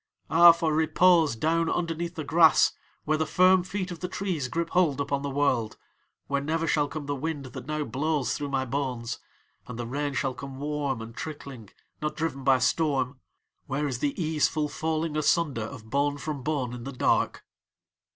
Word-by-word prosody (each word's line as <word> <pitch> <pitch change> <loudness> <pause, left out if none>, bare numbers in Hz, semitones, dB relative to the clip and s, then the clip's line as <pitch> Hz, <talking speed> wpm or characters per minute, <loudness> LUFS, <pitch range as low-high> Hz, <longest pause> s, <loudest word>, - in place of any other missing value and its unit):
Ah, 170 +1 +9
for 165 -2 0
repose 160 -2 +4
down 165 +6 +1
underneath 170 0 -2
the 155 - -4
grass, 160 +1 +5 0.3
where 155 0 +1
the 160 - +1
firm 185 0 +5
feet 185 +1 -4
of 170 - -7
the 180 - -3
trees 180 -7 -2
grip 170 +5 -2
hold 165 -7 +2
upon 140 0 -1
the 140 - -3
world, 130 -6 0 0.5
where 140 0 -1
never 160 +3 -1
shall 150 -3 +2
come 150 0 -6
the 145 - -2
wind 145 0 -4
that 130 0 -9
now 155 0 -1
blows 145 +2 -1
through 145 -1 -4
my 135 -1 0
bones, 125 -3 -3 0.5
and 125 - -7
the 120 - -4
rain 140 +3 -3
shall 135 -2 0
come 135 +1 -8
warm 145 -4 -2
and 115 +1 -10
trickling, 140 -8 -7 0.3
not 150 0 -2
driven 155 -4 -3
by 135 -1 +5
storm, 135 -2 0 0.5
where 140 +3 -1
is 125 -3 -3
the 145 +4 -1
easeful 155 -1 +1
falling 160 +1 -2
asunder 155 -4 +1
of 115 -2 -10
bone 145 +1 +1
from 145 -1 -4
bone 135 -4 -2
in 120 -1 -7
the 135 - -5
dark." 130 - 0
145 Hz, 185 wpm, -27 LUFS, 135-160 Hz, 0.5 s, Ah